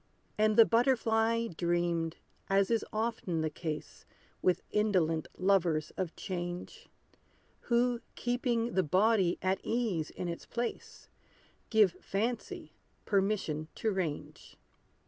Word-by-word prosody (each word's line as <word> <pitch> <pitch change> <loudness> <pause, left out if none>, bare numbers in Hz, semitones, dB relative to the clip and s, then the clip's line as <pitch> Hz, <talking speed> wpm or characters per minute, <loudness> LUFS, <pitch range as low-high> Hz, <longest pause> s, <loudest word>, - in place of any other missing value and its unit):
And 215 0 +2
the 230 - +10
butterfly 230 -1 +2
dreamed, 170 -1 0 0.3
as 195 +2 +3
is 225 -2 +2
often 215 -7 -1
the 155 -1 -1
case 155 -1 -5 0.4
With 180 - +2
indolent 180 -7 +1
lovers 180 -5 +2
of 180 -3 -3
change, 175 -2 -5 0.8
Who, 240 0 +2
keeping 240 -1 0
the 190 - +3
body 185 +2 +3
at 190 0 +1
ease 215 -10 -1
in 180 - -5
its 170 -1 -5
place, 240 0 -5 0.6
Give 215 -5 +5
fancy 225 +8 -3 0.3
permission 195 -7 0
to 220 - 0
range. 175 -7 -4
195 Hz, 110 wpm, -31 LUFS, 175-230 Hz, 0.8 s, the